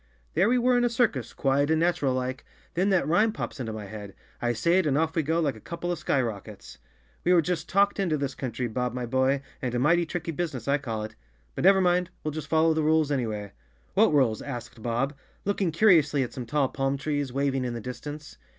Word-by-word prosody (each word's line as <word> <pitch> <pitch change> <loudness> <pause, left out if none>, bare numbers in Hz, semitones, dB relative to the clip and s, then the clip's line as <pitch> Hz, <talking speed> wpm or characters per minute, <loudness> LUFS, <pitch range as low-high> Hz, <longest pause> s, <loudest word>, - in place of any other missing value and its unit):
There 185 +7 +3
we 250 - +3
were 250 +1 +3
in - - +1
a 240 - +3
circus, 215 - 0
quiet 140 +2 +1
and 160 0 +3
natural 165 -6 +1
like, 130 0 -3 0.3
then 185 +4 +1
that 185 -7 +2
rhyme 210 +8 +3
pops 210 - -6
into 115 -3 -3
my 110 -1 -6
head. 100 -1 -9 0.3
I 120 - +1
say 170 +11 +2
it 180 - +1
and 140 -1 +2
off 160 +1 0
we 165 - +3
go 160 +3 0
like 145 -7 0
a - - -11
couple 170 +8 -4
of 175 - -3
skyrockets. 110 - -3 0.4
We 180 - +4
were 175 - +6
just 180 +1 -2
talked 200 +2 +3
into 175 -6 +1
this 140 -2 -2
country, 125 -1 -4
Bob, 125 +1 -2
my 125 -1 -2
boy, 130 +3 +1 0.2
and 125 -3 -2
a - - +2
mighty 170 +6 +3
tricky 170 -1 -3
business 155 -7 -4
I 140 +1 +2
call 115 -6 -4
it. 110 - -7 0.4
But - - -2
never 195 0 +6
mind, 180 0 +2
we'll 155 - -2
just 155 0 -6
follow 160 0 +4
the 160 - 0
rules 155 -1 +2
any¬ 125 -5 0
way." 105 -2 -5
Chapter - - -35 0.4
Three 200 - +5
"What 160 - +1
rules?" 120 -6 +2
asked 120 -4 -7
Bob, 120 +5 -1 0.3
looking 200 -3 0
curiously 155 -6 +4
at 125 - -6
some 125 -3 -6
tall 140 0 +1
palm 135 0 -1
trees, 145 -1 -2
waving 135 0 0
in 120 -1 -3
the - - -4
distance. 145 - -8
145 Hz, 240 wpm, -27 LUFS, 125-170 Hz, 0.4 s, were